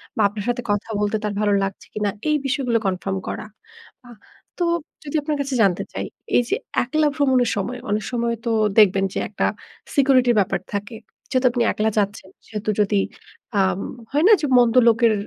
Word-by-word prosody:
বা 220 Hz, -, 0 dB
আপনার 205 Hz, 0 st, -6 dB
সাথে 245 Hz, 0 st, -1 dB
কথা 205 Hz, +2 st, -2 dB
বলতে 210 Hz, +1 st, 0 dB
তার 210 Hz, -1 st, -2 dB
ভালো 205 Hz, -1 st, +2 dB
লাগছে 195 Hz, 0 st, -5 dB
কিনা? 210 Hz, -1 st, -1 dB, 0.2 s
এই 305 Hz, -, +3 dB
বিষয়গুলো 255 Hz, -3 st, +1 dB
কনফার্ম 190 Hz, 0 st, -1 dB
করা। -, -, -4 dB, 0.6 s
আহ 240 Hz, -2 st, -13 dB, 0.4 s
তো 345 Hz, -, +3 dB, 0.4 s
যদি 290 Hz, +1 st, -6 dB
আপনার 295 Hz, 0 st, -2 dB
কাছে 275 Hz, -2 st, -3 dB
জানতে 185 Hz, -3 st, +2 dB
চাই, -, -, -3 dB, 0.3 s
এই -, -, +6 dB
যে 405 Hz, -, +2 dB, 0.3 s
একলা 305 Hz, +5 st, +1 dB
ভ্রমণের 260 Hz, -5 st, +2 dB
সময় 245 Hz, +6 st, -3 dB
অনেক 210 Hz, 0 st, 0 dB
সময় 235 Hz, -1 st, 0 dB
তো 230 Hz, -, 0 dB, 0.3 s
দেখবেন 195 Hz, -2 st, +5 dB
যে -, -, -2 dB
একটা -, -, -1 dB, 0.5 s
সিকিউরিটির 260 Hz, -3 st, +4 dB
ব্যাপার 190 Hz, -2 st, 0 dB
থাকে। 205 Hz, +3 st, -4 dB, 0.3 s
যেহেতু 255 Hz, 0 st, +1 dB
আপনি 240 Hz, -1 st, +1 dB
একলা 215 Hz, +1 st, 0 dB
যাচ্ছেন। 205 Hz, -2 st, -1 dB, 0.2 s
সেহেতু 215 Hz, -1 st, -4 dB
যদি 205 Hz, 0 st, +2 dB, 0.6 s
আম 190 Hz, -1 st, +2 dB, 0.3 s
হয় 295 Hz, +3 st, +2 dB
না -, -, +7 dB
যে -, -, 0 dB
মন্দ 240 Hz, -1 st, +4 dB
লোকের 230 Hz, 0 st, +4 dB
230 Hz, 180 wpm, -22 LUFS, 205-255 Hz, 0.6 s, না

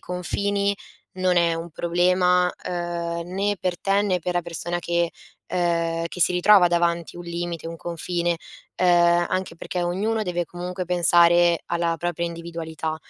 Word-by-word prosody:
confini 200 Hz, +3 st, -1 dB, 0.4 s
non 185 Hz, -1 st, +2 dB
è 170 Hz, -1 st, +3 dB
un 165 Hz, +1 st, -4 dB
problema, 180 Hz, +2 st, +2 dB, 0.2 s
uhm, 170 Hz, -1 st, -3 dB
né 200 Hz, +3 st, -1 dB
per 180 Hz, -2 st, -2 dB
te, 195 Hz, +1 st, +1 dB
né 185 Hz, -3 st, 0 dB
per 180 Hz, -, -2 dB
la 175 Hz, -, +2 dB
persona 170 Hz, +1 st, -3 dB
che, 170 Hz, 0 st, 0 dB, 0.4 s
uhm, 170 Hz, -2 st, 0 dB
che 180 Hz, -, -8 dB
si -, -, +5 dB
ritrova 180 Hz, 0 st, +6 dB
davanti 170 Hz, -1 st, 0 dB
un 175 Hz, -, -8 dB
limite, 170 Hz, -1 st, -4 dB
un 165 Hz, 0 st, -6 dB
confine, 170 Hz, +1 st, -2 dB, 0.4 s
ehm, 175 Hz, -1 st, +4 dB
anche 185 Hz, -2 st, -3 dB
perché 180 Hz, +1 st, -4 dB
ognuno 205 Hz, +6 st, -1 dB
deve 175 Hz, -3 st, -2 dB
comunque 180 Hz, +2 st, -5 dB
pensare 175 Hz, -1 st, +4 dB
alla 170 Hz, -1 st, 0 dB
propria 170 Hz, +1 st, -2 dB
individualità. 165 Hz, -2 st, -5 dB
175 Hz, 150 wpm, -23 LUFS, 170-180 Hz, 0.4 s, ritrova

